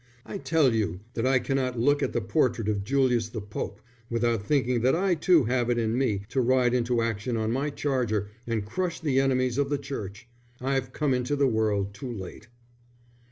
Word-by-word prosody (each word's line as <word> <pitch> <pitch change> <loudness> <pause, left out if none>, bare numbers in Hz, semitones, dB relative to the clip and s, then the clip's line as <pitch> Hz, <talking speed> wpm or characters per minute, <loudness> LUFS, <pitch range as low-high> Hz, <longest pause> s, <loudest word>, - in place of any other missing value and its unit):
I 200 - -6
tell 155 -9 +3
you 95 -5 -1
that 115 +2 0
I 130 0 +4
cannot 130 0 -1
look 145 +5 +3
at - - 0
the - - -1
portrait 120 -8 +1
of 105 -2 0
Julius 125 -1 +1
the 110 - -5
Pope 100 0 -6 0.3
without 115 -2 +1
thinking 125 -1 +1
that 130 +5 +3
I 190 +2 +2
too 170 -1 +4
have 120 0 0
it 120 - +2
in 115 -1 0
me 110 -7 0
to 130 - +1
ride 125 0 +3
into 120 -1 +1
action 115 +1 -2
on 110 0 0
my 135 +5 0
charger 125 -8 -1 0.2
and 110 -3 -1
crush 170 - -2
the 140 -5 +1
enemies 130 -1 +1
of 140 -1 +1
the 145 - +1
Church. 115 -6 -7 0.3
I've 130 -1 -1
come 145 0 0
into 125 +3 0
the 140 -1 +2
world 105 -4 0
too 125 +5 -6
late." 105 +1 -8
125 Hz, 200 wpm, -27 LUFS, 110-135 Hz, 0.3 s, I